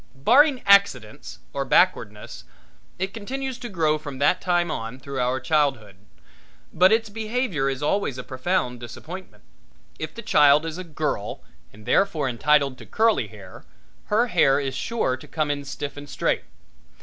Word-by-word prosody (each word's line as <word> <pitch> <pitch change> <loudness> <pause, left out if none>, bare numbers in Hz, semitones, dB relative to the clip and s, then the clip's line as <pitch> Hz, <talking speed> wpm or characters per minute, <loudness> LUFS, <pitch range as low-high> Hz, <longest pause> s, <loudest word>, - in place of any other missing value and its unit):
Barring 255 - +4
accidents 195 - +2 0.2
or - - -1
backwardness, - - +1 0.5
it 190 +1 -3
continues 260 +4 -5
to 240 - -6
grow 155 -4 +1
from 145 -3 -8
that 145 +6 +2
time 175 -2 +1
on 115 +3 -5
through 135 0 -6
our 125 +1 0
childhood, 135 - 0 0.8
but 185 +3 +5
its 225 0 +2
behavior 215 - -2
is 135 +1 -4
always 150 -5 0
a 125 - -5
profound 130 -2 -2
disappointment. 155 +10 -10 0.6
If - - -6
the 230 - -8
child 150 -4 +5
is 165 +2 -5
a - - -5
girl 150 - -4 0.3
and, 105 +1 -16
therefore, 160 - +1
entitled 135 +2 +1
to - - -11
curly 225 +1 +2
hair, - - -13 0.4
her 220 +3 +2
hair 135 - +3
is 135 -2 -3
sure 140 - -1
to - - -14
come 155 -2 -1
in 145 0 -3
stiff 140 +1 -6
and 145 0 -10
straight. - - -1
150 Hz, 160 wpm, -24 LUFS, 135-200 Hz, 0.8 s, but